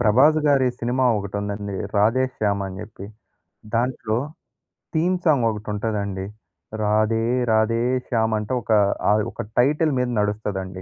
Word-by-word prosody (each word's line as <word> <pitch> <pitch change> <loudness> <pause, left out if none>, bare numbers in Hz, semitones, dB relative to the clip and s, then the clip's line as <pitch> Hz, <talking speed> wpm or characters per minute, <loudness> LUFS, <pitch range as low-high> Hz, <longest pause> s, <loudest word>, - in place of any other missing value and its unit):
'ప్రభాస్' 140 +9 +4
గారి 135 -3 +4
సినిమా 125 +2 0
ఒకటుందండి. 100 0 -4 0.2
'రాధే 110 +6 +3
శ్యామ్' 100 -2 0
అని 95 0 -7
జెప్పి. 100 -2 -10 0.7
దాంట్లో 115 -2 0 0.8
తీమ్ 180 +3 +2
సాంగోకటి 115 -9 +1
ఉంటదండి. 100 -3 -3 0.6
రాధే 110 +2 +2 0.3
రాధే 110 +1 +2 0.3
శ్యామంట 110 -2 0
ఒక - - -5 0.4
ఆ - - +5 0.2
ఒక - - -6 0.2
టైటిల్ 150 +5 +3
మీద 125 -1 0
నడుస్తదండి. 100 -3 -3
110 Hz, 115 wpm, -22 LUFS, 100-125 Hz, 0.8 s, ఆ